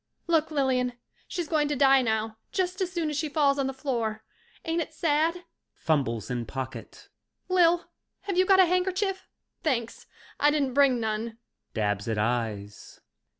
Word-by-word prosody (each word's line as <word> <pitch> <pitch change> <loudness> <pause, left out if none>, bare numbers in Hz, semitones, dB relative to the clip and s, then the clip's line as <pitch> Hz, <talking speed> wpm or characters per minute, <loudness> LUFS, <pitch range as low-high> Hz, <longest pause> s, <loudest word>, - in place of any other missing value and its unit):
Look, 325 -2 +2
Lilian, 260 -4 +1 0.3
she's 345 -3 -3
going 300 -2 +1
to 295 - -1
die 270 0 +5
now 220 -2 -1
just 370 0 -1
as 365 -1 -1
soon 335 -4 -1
as 295 - -3
she 310 0 -1
falls 285 -2 +2
on 270 - +1
the - - -1
floor. 235 -6 -2 0.4
Ain't 330 +1 0
it 315 -1 -6
sad? 325 +3 +1 0.3
(Fumbles 130 -7 -1
in 120 -2 -3
pocket.) 130 +2 -7 0.4
Lil, 350 -1 +4 0.4
have 395 -3 -3
you 370 +1 +3
got 385 -1 +6
a 375 - +8
handkerchief? 375 +2 0 0.3
Thanks, 235 -7 -2 0.3
I 295 - +5
didn't 285 -4 0
bring 270 -3 +4
none. 220 +1 -3 0.4
(Dabs 105 -1 -1
at 110 -2 -1
eyes.) 105 -2 -3
275 Hz, 160 wpm, -27 LUFS, 220-335 Hz, 0.4 s, a